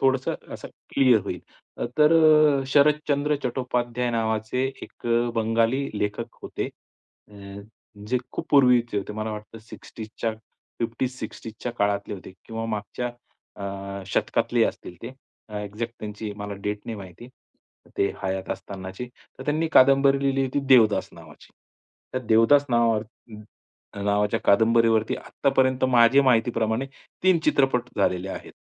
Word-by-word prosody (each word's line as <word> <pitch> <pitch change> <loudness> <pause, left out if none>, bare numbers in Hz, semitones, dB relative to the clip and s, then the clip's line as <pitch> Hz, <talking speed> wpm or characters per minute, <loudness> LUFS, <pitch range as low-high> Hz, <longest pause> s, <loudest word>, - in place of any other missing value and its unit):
थोडंसं 135 0 +1 0.2
असं - - -9 0.3
क्लिअर 130 -5 +5
होईल, 90 -3 -4 0.6
तर 150 +2 +6 0.5
अ, 135 - -4
शरदचंद्र 150 +1 +2
चट्टोपाध्याय 125 -1 -1
नावाचे 110 +2 -1 0.2
एक - - -10
अ, 120 0 +2
बंगाली 115 +4 +1
लेखक 105 0 -3
होते. - - -4 0.6
अ, - - -16 0.7
जे 125 0 +2
खूप - - -5
पूर्वीचे 125 -6 +4
होते 100 - -5
मला 110 +1 -4
वाटतं 105 +1 -8
60s 110 0 -11
च्या 115 - 0 0.5
50-60s 115 -1 -4
च्या 120 - -3
काळातले 100 -2 -1
होते 95 - -11
किंवा 115 0 -5
मागच्या 110 +3 -4 0.6
अ, 100 0 -6
शतकातले - - +1
असतील 90 - -5
ते, 120 +3 -7 0.4
अ, 105 - -7
एक्झॅक्ट 105 +3 -5
त्यांची 105 0 -6
मला 105 0 -5
डेट 105 +1 -3
नाही 115 - -4
माहिती 95 +4 -11 0.7
ते 100 - +3
हयात 95 0 -3
असतानाची. 95 +4 -6 0.3
तर 130 - -8
त्यांनी 155 +3 0
कादंबरी 135 +1 +6
लिहिली 135 0 +1
होती 135 +2 -1
देवदास 115 -5 +5
नावाची. - - -15 0.8
देवदास 115 +6 +5
नाव 115 -1 +3
हं. 110 0 -12 0.6
नावाच्या 105 0 +1
कादंबरीवरती 110 +1 +3
आत्तापर्यंत 130 -1 0
माझी 125 +2 +5
माहिती 120 -3 +3
प्रमाणे 115 +3 -1 0.4
3 185 -2 +4
चित्रपट 135 -4 +2
झालेले 95 -1 0
आहेत. - - -7
115 Hz, 130 wpm, -25 LUFS, 105-130 Hz, 0.8 s, तर